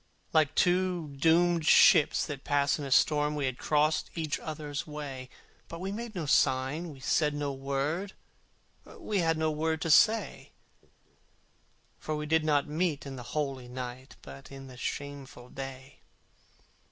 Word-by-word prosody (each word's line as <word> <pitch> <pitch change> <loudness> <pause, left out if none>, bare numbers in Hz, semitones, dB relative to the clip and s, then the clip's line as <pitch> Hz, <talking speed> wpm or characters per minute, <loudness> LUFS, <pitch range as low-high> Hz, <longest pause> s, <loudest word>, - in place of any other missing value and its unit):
Like 155 -2 +3
two 180 -3 +1
doomed 165 +3 +2
ships 150 - +6
that 140 -2 -7
pass 145 +1 +1
in 140 -2 -5
storm 150 +2 +3
We 145 -2 -1
had 130 -1 -3
crossed 155 +1 +1
each 160 -3 -2
other's 150 -2 -5
way: 140 -4 -7 0.4
But 165 - -8
we 190 +2 -4
made 225 +1 -6
no 170 -4 -3
sign, 135 +4 +1
we 140 -3 -11
said 150 +2 +1
no 145 -1 -2
word, 140 +8 -3 0.7
We 205 -2 -4
had 165 -2 +1
no 160 0 +1
word 160 +1 -1
to 165 - 0
say; 215 +5 +3 1.5
For 155 - -3
we 150 0 -4
did 160 +1 +2
not 145 -2 +1
meet 155 -1 -1
in 135 -1 -7
the 125 - -7 0.2
holy 135 -4 -2
night, 125 +1 -7
But 70 - -12
in 135 0 -9
the 130 -1 -12
shameful 135 -1 -6
day. 135 +1 -9
150 Hz, 150 wpm, -29 LUFS, 135-160 Hz, 1.5 s, ships